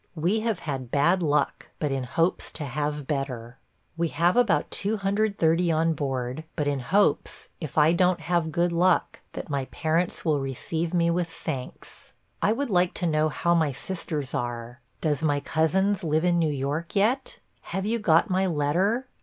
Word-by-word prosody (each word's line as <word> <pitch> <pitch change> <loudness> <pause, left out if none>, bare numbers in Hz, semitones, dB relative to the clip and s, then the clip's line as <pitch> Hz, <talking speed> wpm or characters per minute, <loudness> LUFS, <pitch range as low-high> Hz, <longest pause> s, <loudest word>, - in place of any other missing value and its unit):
We 175 +7 +1
have 220 -3 -1
had 135 -5 -4
bad 145 +8 +3
luck, 150 -3 0
but 150 -3 -1
in 135 -2 -2
hopes 165 +8 0
to 155 - -3
have 145 +1 -3
better. 130 -5 -3 0.4
We 170 0 0
have 170 +3 +2
about 245 -4 +2
230 195 -5 +1
on 165 +1 +2
board, 135 -1 -3
but 150 - -1
in 145 -1 0
hopes, 195 +12 +1
if 155 -5 -6
do 155 - +5
n't 175 +3 +4
kave 170 0 0
good 170 +3 +1
luck, 175 +1 +2
that - - -6
my 140 -2 -1
parents 165 +6 -1
will 155 -3 +2
receive 160 +5 -3
me 170 -1 +2
with 175 0 0
thanks. 140 -5 -7 0.3
I 210 - +3
would 250 +2 -1
like 180 -1 +2
to 180 - -1
know 155 -1 +2
how 170 +3 +1
my 160 -4 +2
sisters 150 -1 -4
are. 120 -1 -4 0.2
Does 150 -3 0
my 145 -2 +1
cousins 190 +7 +1
live 160 +1 +1
in 175 -1 +3
New 160 -2 +2
York 145 +6 -3
yet? 255 - +1 0.2
Have 190 0 -4
you 230 +2 0
got 170 -1 +4
my 190 -1 +1
letter? 180 - +1
165 Hz, 175 wpm, -26 LUFS, 145-180 Hz, 0.4 s, do